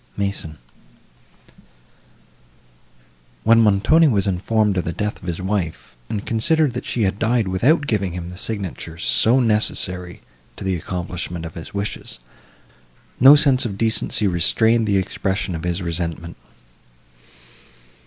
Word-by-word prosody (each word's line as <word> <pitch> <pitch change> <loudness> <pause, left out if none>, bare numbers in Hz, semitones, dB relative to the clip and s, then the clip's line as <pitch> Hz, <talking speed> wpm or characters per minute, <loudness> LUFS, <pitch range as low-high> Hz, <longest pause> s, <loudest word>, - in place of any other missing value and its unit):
MASON 100 -6 -3 2.9
When 115 +1 +5
Montoni 110 +11 +4
was 100 -8 +1
informed 100 +2 0
of 90 - 0
the 85 - -3
death 105 +5 -3
of 90 - -10
his 85 -2 -3
wife, 95 -9 -4
and 105 -1 -4
considered 150 +5 +1
that 125 - -6
she 115 - -1
had 95 +1 -1
died 115 -2 +1
without 130 - +2
giving 100 -8 -1
him 90 0 -6
the 90 - -10
signature 95 -7 -5
so 115 +8 +3
necessary 90 -6 0 0.3
to - - -9
the 95 -1 -1
accomplishment 90 0 -5
of 80 - -8
his 85 +4 -10
wishes, 100 +1 -4 1.0
no 135 +4 +9
sense 140 -3 +3
of 100 -5 -4
decency 110 -1 +1
restrained 110 +5 +2
the 100 -1 +2
expression 95 0 -2
of 80 +1 -5
his 90 +1 -2
resentment. 85 0 -4
100 Hz, 135 wpm, -20 LUFS, 90-115 Hz, 2.9 s, no